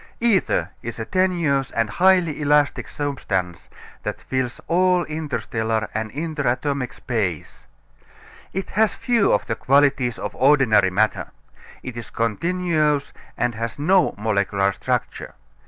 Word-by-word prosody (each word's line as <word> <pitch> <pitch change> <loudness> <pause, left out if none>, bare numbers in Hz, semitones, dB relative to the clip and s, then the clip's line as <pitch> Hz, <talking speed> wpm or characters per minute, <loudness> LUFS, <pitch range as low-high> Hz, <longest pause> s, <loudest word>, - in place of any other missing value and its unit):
Ether 230 -5 +1
is 120 0 -6
a 110 - -4
tenuous 170 -6 +1
and 115 -1 0
highly 175 - +2
elastic 145 0 +2
substance 95 - -3 0.3
that - - -4
fills 130 -2 -3
all 180 +1 +3
interstellar 115 -8 -2
and 110 0 -3
interatomic 140 -3 -2
space. 100 -10 -4 0.8
It 190 +1 -4
has 220 +1 +2
few 235 -5 +2
of - - +1
the 115 - -2
qualities 135 -1 +2
of - - -5
ordinary 130 -8 +4
matter. 105 +4 0 0.6
It 130 - -7
is 120 -1 -7
continuous 150 - 0 0.2
and 120 0 0
has 115 +1 -4
no 175 +3 +3
molecular 100 -2 +1
structure. - - -3
140 Hz, 125 wpm, -22 LUFS, 110-165 Hz, 0.8 s, ordinary